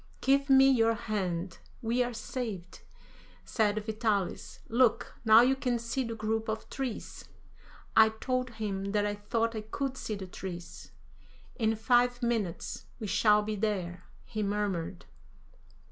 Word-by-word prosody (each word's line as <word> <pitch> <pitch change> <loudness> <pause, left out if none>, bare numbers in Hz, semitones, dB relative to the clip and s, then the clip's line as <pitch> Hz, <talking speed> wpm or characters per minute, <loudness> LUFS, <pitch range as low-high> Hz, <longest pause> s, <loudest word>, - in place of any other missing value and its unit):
"Give 275 +1 +2
me 270 0 +7
your 230 -4 +4
hand, 185 -5 -3 0.2
we 235 +2 +1
are 245 0 0
saved," 220 -6 -5 0.6
said 215 -2 0
Vitalis; 215 -4 -2
"look, 240 0 +2
now 220 0 +8
you 260 +2 +4
can 250 -3 0
see 235 +3 -2
the 230 -2 -4
group 220 0 -2
of 220 0 -3
trees." 260 -5 -5 0.7
I 220 0 +8
told 255 +3 -2
him 200 -2 -3
that 205 -1 +2
I 205 - 0
thought 225 +3 -1
I 215 - -2
could 265 +5 -4
see 215 - -3
the 195 -2 -6
trees. 180 -1 -8 0.7
"In 225 -3 +1
five 245 +2 +2
minutes 225 -8 -2
we 220 - -4
shall 210 +1 +4
be 215 0 -2
there," 185 -4 -2 0.2
he 215 - -4
murmured. 200 - -2
220 Hz, 145 wpm, -30 LUFS, 205-240 Hz, 0.7 s, now